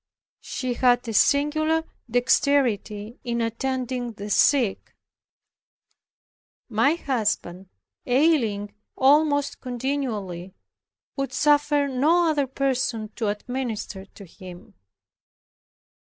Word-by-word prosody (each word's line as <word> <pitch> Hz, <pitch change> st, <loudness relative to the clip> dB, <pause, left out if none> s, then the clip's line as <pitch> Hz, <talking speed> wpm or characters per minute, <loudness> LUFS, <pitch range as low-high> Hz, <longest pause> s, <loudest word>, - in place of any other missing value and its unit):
She 255 Hz, -1 st, -4 dB
had 245 Hz, 0 st, +2 dB
a 225 Hz, -, -3 dB
singular 310 Hz, +6 st, +2 dB, 0.3 s
dexterity 240 Hz, -3 st, +1 dB
in 235 Hz, -1 st, -2 dB
attending 245 Hz, +1 st, -2 dB
the 205 Hz, 0 st, -7 dB
sick. 245 Hz, -3 st, +2 dB, 1.7 s
My 235 Hz, +7 st, +2 dB
husband, 210 Hz, -, -2 dB, 0.4 s
ailing 245 Hz, -7 st, +2 dB, 0.2 s
almost 285 Hz, +1 st, +3 dB
continually, 230 Hz, -9 st, -4 dB, 0.6 s
would 275 Hz, 0 st, -2 dB
suffer 295 Hz, -1 st, +2 dB
no 315 Hz, +6 st, +2 dB
other 285 Hz, -3 st, 0 dB
person 260 Hz, -4 st, -1 dB
to 220 Hz, 0 st, -4 dB
administer 215 Hz, -2 st, -4 dB
to 200 Hz, 0 st, -14 dB
him. 185 Hz, +4 st, -13 dB
250 Hz, 85 wpm, -24 LUFS, 215-280 Hz, 1.7 s, almost